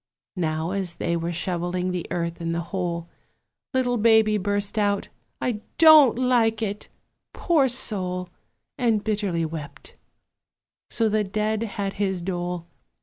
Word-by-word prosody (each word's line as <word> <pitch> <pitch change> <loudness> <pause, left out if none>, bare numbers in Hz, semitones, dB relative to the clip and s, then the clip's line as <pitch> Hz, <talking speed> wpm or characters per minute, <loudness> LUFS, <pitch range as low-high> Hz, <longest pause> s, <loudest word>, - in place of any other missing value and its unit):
Now, 160 0 -1
as 190 -3 -2
they 170 - -1
were 170 0 -2
shovelling 175 +1 -1
the 180 -2 -4
earth 170 0 -3
in 165 0 -2
the 170 - -1
hole, 170 -3 -2 0.6
Little 250 -2 +1
Baby 220 -1 +4
burst 205 +2 0
out, 205 -1 0 0.3
"I 225 -4 -2 0.2
don't 310 -7 +8
like 235 -3 +2
it!" 205 -1 -4 0.4
poor 305 -7 +2
soul! 185 -7 -2 0.5
And 225 -4 +2
bitterly 200 -6 -1
wept. 150 -3 -8 0.9
So 225 -1 +1
the 215 0 +1
dead 215 +2 -1
had 200 -3 -3
his 190 -3 -1
dole. 175 -1 -3
200 Hz, 135 wpm, -24 LUFS, 175-220 Hz, 0.9 s, don't